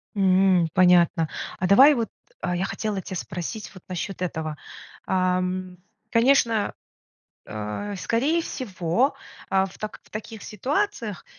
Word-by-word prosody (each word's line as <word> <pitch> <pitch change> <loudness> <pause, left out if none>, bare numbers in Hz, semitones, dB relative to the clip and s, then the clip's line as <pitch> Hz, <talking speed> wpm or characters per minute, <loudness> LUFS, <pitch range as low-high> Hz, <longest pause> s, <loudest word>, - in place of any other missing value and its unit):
М. 185 -3 +4
Понятно. 175 -3 +4 0.3
А 185 - +1
давай 270 +10 +8
вот, 230 -4 -1 0.3
э, 180 -1 -1
я 185 - 0
хотела 205 0 -3
тя 185 +1 -7
спросить 180 +5 -5
вот 185 - -13
насчет 185 +1 -4
этого. 160 -4 -3 0.5
Ам, 185 0 0 0.3
конечно, 230 -3 +3 0.7
э, 110 - -5
скорее 275 - +1
всего, 215 - -1 0.3
э, 190 0 +3
в 190 - -12
так 215 - -6
в - - -23
таких 220 0 -7
ситуациях, 255 - -2
190 Hz, 125 wpm, -25 LUFS, 180-225 Hz, 0.7 s, давай